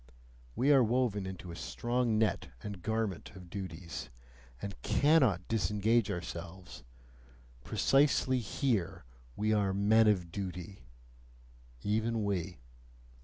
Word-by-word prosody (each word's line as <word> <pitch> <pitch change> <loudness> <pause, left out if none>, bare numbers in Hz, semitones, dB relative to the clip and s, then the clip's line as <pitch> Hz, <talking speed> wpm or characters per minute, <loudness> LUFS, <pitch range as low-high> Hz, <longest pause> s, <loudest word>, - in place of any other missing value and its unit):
We 145 +3 +4
are 135 -3 +6
woven 115 -4 +1
into 90 -2 -7
a - - -7
strong 120 +3 -1
net 110 -1 +1 0.2
and 100 -4 -6
garment 110 -2 -2
of 90 -2 -12
duties, 85 -7 -6 0.5
and 100 - -5
CANNOT 135 - +3
disengage 105 +2 +2
ourselves 90 0 -6 0.8
precisely 135 -2 +3
here, 100 - -1 0.3
we 110 +1 +1
are 100 -2 +1
"men 110 +3 +5
of 90 -5 +2
duty," 95 0 -6 1.0
even 110 +1 0
we! 95 -3 -2
105 Hz, 110 wpm, -32 LUFS, 90-115 Hz, 1.0 s, are